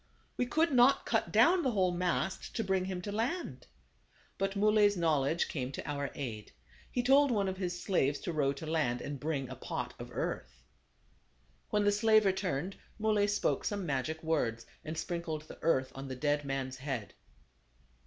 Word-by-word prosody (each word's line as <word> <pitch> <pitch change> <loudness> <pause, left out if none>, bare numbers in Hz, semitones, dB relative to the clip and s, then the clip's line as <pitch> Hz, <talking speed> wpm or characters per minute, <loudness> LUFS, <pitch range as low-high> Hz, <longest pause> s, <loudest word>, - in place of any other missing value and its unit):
We 250 - 0
could 320 +5 +2
not 260 +2 +5
cut - - 0
down 360 +1 +5
the 265 - +1
whole 185 -3 +2
mast 180 +2 -2
to 225 - 0
bring 190 -2 +1
him 185 -1 -4
to 205 - -4
land. 240 - -3 0.7
But 195 +1 0
Muley's 205 0 +4
knowledge 160 -1 +2
came 130 -3 -3
to - - -6
our 140 -1 -2
aid. 115 -7 -6 0.4
He 245 - 0
told 275 +3 +5
one 205 -5 +1
of 190 0 -3
his 180 -2 -3
slaves 145 -8 +1
to 175 - -3
row 145 -3 +2
to 140 +3 -8
land, 155 -7 0
and 145 -1 -5
bring 145 -3 -2
a - - -7
pot - - -4
of - - -7
earth. 60 -1 -4 1.1
When 210 0 +2
the 205 - +4
slave 215 +1 +4
returned, 190 -2 -1 0.2
Muley 215 -2 +2
spoke 205 0 0
some 205 -3 -2
magic 155 +2 -2
words, 115 -8 0 0.2
and 155 +1 -5
sprinkled 165 -2 -3
the 155 - -12
earth 130 -5 +2
on 135 +1 -7
the 130 - -5
dead 145 +2 0
man's 135 -1 -3
head. 130 -5 -4
175 Hz, 180 wpm, -32 LUFS, 140-205 Hz, 1.1 s, not